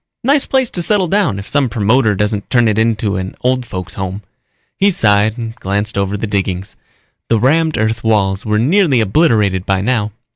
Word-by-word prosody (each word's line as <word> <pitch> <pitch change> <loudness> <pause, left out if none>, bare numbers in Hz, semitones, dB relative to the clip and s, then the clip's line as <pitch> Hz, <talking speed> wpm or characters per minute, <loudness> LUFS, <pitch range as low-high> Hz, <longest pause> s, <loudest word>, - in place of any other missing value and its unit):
Nice 280 +3 +2
place 265 -3 0
to 175 - -2
settle 195 +1 +1
down 180 - +1
if 100 - -8
some 140 -3 +1
promoter 110 0 +2
doesn't 105 0 -2
turn 120 -2 +3
it 110 0 +1
into 110 -3 0
an 95 0 -5
old 125 -1 0
folks 90 -1 -6
home._ 95 +1 -5 0.5
He 200 - +3
sighed 110 - +2
and 115 -2 -5
glanced 105 0 -3
over 100 +1 -1
the 110 - -3
diggings. 95 -2 -3 0.5
The 115 - +2
rammed 155 +6 +2
earth 110 0 -1
walls 100 -3 +1
were 105 -1 0
nearly 145 - +2
obliterated 105 - +2
by 95 0 0
now. 110 -1 -1
110 Hz, 185 wpm, -15 LUFS, 100-130 Hz, 0.5 s, turn